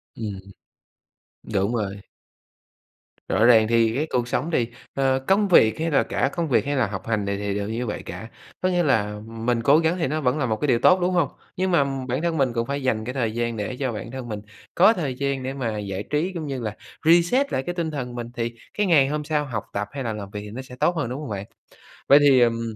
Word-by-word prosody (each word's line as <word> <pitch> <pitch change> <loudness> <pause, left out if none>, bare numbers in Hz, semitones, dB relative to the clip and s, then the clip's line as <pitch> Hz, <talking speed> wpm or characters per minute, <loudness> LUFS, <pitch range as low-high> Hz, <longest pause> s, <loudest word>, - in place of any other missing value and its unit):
Ừm. 105 -4 -5 1.1
Đúng 100 +3 +1
rồi. 100 -3 -2 1.3
Rõ 110 +4 +3
ràng 110 -3 +6
thì 115 0 +3
cái 150 +3 0
cuộc 120 -1 0
sống 150 +6 -1
thì, 120 -7 +1 0.3
ờ, 135 -1 +2
công 200 +1 +3
việc 110 - +5
hay 165 +1 -1
là 140 - +4
cả - - 0
công 170 -2 -1
việc 125 - +2
hay 145 0 -1
là 130 -6 +2
học 95 0 -6
hành 110 -3 0
này 100 0 -1
thì 100 -1 -2
đều 100 0 -3
như 115 +3 -2
vậy - - -4
cả, 110 - -7 0.3
có 185 - +2
nghĩa 175 -1 +2
là 105 -7 +1
mình 115 +1 -1
cố 140 +5 +6
gắng 165 +2 +1
thì 165 - +1
nó 155 +3 -2
vẫn 125 +2 +1
là 135 - 0
một 110 - 0
cái 150 - +1
điều 120 -4 +3
tốt, 185 +9 +5
đúng 180 +1 +1
hông? 170 -6 +2 0.3
Nhưng 185 0 0
mà 165 -5 +4 0.2
bản 130 +4 -1
thân 170 -2 0
mình 130 -3 +1
cũng 115 0 -1
phải 140 0 -3
dành 110 -4 0
cái 125 - -4
thời 120 -5 -1
gian 115 0 -2
để 105 +4 -3
cho 130 -3 -1
bản 115 +1 -6
thân 130 -2 -6
mình 105 -1 -4 0.4
có 195 +6 +6
thời 150 - -3
gian 140 0 -2
để 130 +1 -3
mà 120 -6 -3
giải 100 -1 -4
trí 155 +5 0
cũng 160 -4 -4
như 135 -2 -3
là 105 -2 -4 0.3
reset 175 - +4
lại 130 - 0
cái 175 +3 -4
tinh 165 -3 -2
thần 125 -5 -5
mình, 120 -1 -4
thì 115 0 -2 0.2
cái 210 - +2
ngày 145 -6 +5
hôm 150 +1 -2
sau 150 -1 -1
học 110 -6 -4
tập 105 0 -2
hay 140 -1 -5
là 115 -3 -2
làm 100 -2 -7
việc 105 - -5
thì 105 0 -9
nó 130 +5 -6
sẽ 125 -1 -11
tốt 175 +7 +1
hơn, 140 -7 -2
đúng 130 - -4
hông 145 - -6
bạn? 100 -1 -4 0.6
Vậy 140 - +9
thì, 140 -3 +6
ừm, 115 -1 +1
125 Hz, 260 wpm, -24 LUFS, 110-150 Hz, 1.3 s, Vậy